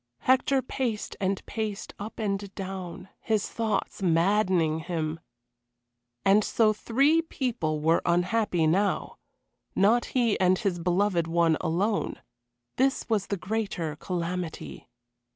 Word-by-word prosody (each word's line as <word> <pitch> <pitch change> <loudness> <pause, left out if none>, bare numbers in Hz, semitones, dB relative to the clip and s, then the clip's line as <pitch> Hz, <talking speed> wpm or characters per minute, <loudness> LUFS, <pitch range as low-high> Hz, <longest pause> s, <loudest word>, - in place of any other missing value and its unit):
Hector 260 +1 +3
paced 245 -5 -3
and 195 0 -1
paced 215 -2 -4
up 210 +2 -7
and 200 -2 -2
down, 190 -1 -6
his 215 -2 0
thoughts 220 -3 -2
maddening 175 -2 +2
him. 160 -1 -3 1.1
And 205 +2 +5
so 215 0 +3
three 275 +9 +3
people 230 - -2
were 160 +2 +3
unhappy 180 0 +1
now 195 +6 +1 0.6
not 220 +5 +4
he 235 -4 +2
and 185 0 +4
his 185 -4 -1
beloved 175 0 +1
one 165 -1 +3
alone. 200 +6 0 0.6
This 265 +1 +1
was 215 -4 +1
the 200 - -2
greater 190 -6 -3
calamity. 175 0 -4
195 Hz, 115 wpm, -27 LUFS, 170-220 Hz, 1.1 s, And